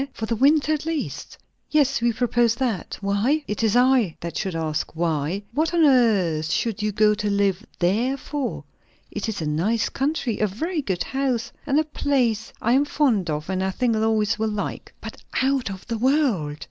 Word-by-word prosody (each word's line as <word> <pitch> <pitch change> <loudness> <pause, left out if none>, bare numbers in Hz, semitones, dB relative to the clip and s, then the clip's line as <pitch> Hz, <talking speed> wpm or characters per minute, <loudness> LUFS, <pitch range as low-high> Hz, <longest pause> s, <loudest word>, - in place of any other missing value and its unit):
_ 275 - -3
for 220 - -4
the 230 - -1
winter 295 +5 +3
at 300 - -2
least?" 325 -2 -4 0.3
"Yes, 275 -5 +2
we 235 0 +3
propose 235 0 +1
that. 235 -7 -2
Why?" 210 +10 +1
"It 210 - -3
is 220 -1 +2
I 245 -8 +3
that 170 -1 -5
should 185 +2 -2
ask 155 -1 -2
'why.' 165 +3 -1
What 315 +5 0
on 330 -2 +5
earth 200 - +3
should 220 +5 -1
you 210 0 0
go 210 +1 +4
to 210 0 -2
live 200 0 +1
there 225 +10 +1
for?" 275 -1 -4 0.5
"It - - -3
is 200 -6 -3
a - - -2
nice 180 +10 0
country, 270 -4 -1
a 215 - +2
very 315 - -3
good 190 -9 -2
house, 265 -4 -2 0.2
and 280 +2 +3
a - - +3
place 255 -7 0
I 230 - +2
am 275 +3 +4
fond 245 - +1
of, 150 0 -3
and 190 0 -1
I 190 - 0
think 230 +4 0
Lois 220 0 +1
will 220 0 0
like." 210 -1 -4
"But - - -9 0.2
out 270 -4 +1
of 190 -1 -8
the 230 -2 -3
world!" 240 - +1
225 Hz, 200 wpm, -23 LUFS, 195-270 Hz, 0.5 s, on